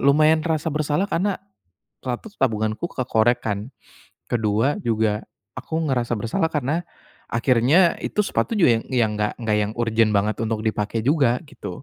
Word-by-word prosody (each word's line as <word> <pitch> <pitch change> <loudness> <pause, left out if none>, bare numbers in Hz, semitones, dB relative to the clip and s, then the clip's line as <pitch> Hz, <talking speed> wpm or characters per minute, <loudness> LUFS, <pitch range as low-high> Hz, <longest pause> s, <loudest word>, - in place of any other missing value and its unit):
lumayan 155 +3 +5
terasa 160 -1 0
bersalah 150 +5 0
karena, 190 +3 +1 0.7
1, 125 - -4
tabunganku 110 +1 0
kekoreh 120 -2 +2
kan, 105 +4 -3 0.6
ke-2 115 +4 +1
juga 110 -2 +1 0.4
aku 160 - -3
ngerasa 120 -2 0
bersalah 115 +9 0
karena 150 +4 -1 0.5
akhirnya 130 +9 +3
itu 210 - 0
sepatu - - -1
juga 120 -10 +5
yang - - -13
yang 115 -4 +2
enggak 105 0 0
enggak 110 -2 +1
yang 105 0 -1
urgen 115 -2 +2
banget 105 +2 +1
untuk 110 -1 -2
dipakai 110 +1 -1
juga 135 -4 +2
gitu. 145 - -8
120 Hz, 145 wpm, -23 LUFS, 110-150 Hz, 0.7 s, lumayan